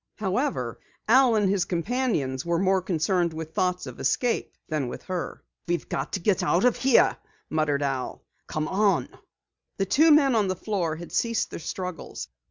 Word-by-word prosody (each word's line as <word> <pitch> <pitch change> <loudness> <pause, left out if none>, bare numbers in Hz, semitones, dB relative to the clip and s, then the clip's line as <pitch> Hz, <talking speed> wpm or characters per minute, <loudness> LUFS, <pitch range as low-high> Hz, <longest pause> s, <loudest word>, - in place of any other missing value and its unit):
However, 195 - -1 0.3
Al 250 0 +5
and 205 -2 +3
his 190 -1 +2
companions 170 - -1
were 170 0 0
more 190 +1 +2
concerned 175 -1 0
with 160 0 -7
thoughts 180 -1 0
of - - -9
escape 245 -2 0 0.2
than 150 -5 -1
with 120 - -7
her. 185 -2 -5 0.2
"We've 175 0 -1
got - - -3
to 195 - 0
get 190 +1 +1
out 180 +3 +2
of 250 - +4
here," 255 0 +4 0.3
muttered 150 -2 +1
Al. 135 -2 -3 0.2
"Come 155 0 -2
on!" 195 -1 +2 0.7
The 195 - +1
two 310 - +4
men 290 -3 +6
on 215 -3 +2
the 185 - -1
floor 180 -5 -2
had 170 +1 -9
ceased 230 -1 0
their - - -5
struggles. 180 - -6
185 Hz, 175 wpm, -26 LUFS, 160-220 Hz, 0.7 s, men